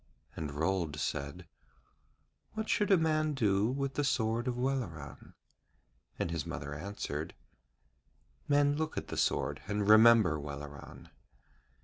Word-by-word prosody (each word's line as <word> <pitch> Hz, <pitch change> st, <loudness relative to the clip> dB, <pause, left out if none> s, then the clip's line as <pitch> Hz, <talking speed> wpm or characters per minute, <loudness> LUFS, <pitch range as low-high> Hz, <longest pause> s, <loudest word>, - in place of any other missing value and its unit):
And 80 Hz, -2 st, -4 dB
Rold 80 Hz, -1 st, 0 dB
said: 70 Hz, +7 st, -3 dB, 1.1 s
'What 220 Hz, 0 st, -3 dB
should 210 Hz, -, +2 dB
a 195 Hz, -, +6 dB
man 155 Hz, -2 st, +1 dB
do 105 Hz, -4 st, +2 dB
with 135 Hz, +1 st, -2 dB
the 145 Hz, -, 0 dB
sword 115 Hz, -2 st, 0 dB
of 125 Hz, -1 st, -1 dB
Welleran?' 120 Hz, -, -4 dB, 0.8 s
And 85 Hz, -, -2 dB
his 85 Hz, -3 st, -2 dB
mother 70 Hz, +1 st, -6 dB
answered: 100 Hz, +8 st, -5 dB, 1.1 s
'Men 145 Hz, 0 st, +3 dB
look 155 Hz, 0 st, -3 dB
at -, -, -4 dB
the -, -, -4 dB
sword 70 Hz, +2 st, 0 dB
and 105 Hz, 0 st, -1 dB
remember 110 Hz, -7 st, +7 dB
Welleran.' 70 Hz, -1 st, -9 dB
105 Hz, 125 wpm, -32 LUFS, -, 1.1 s, remember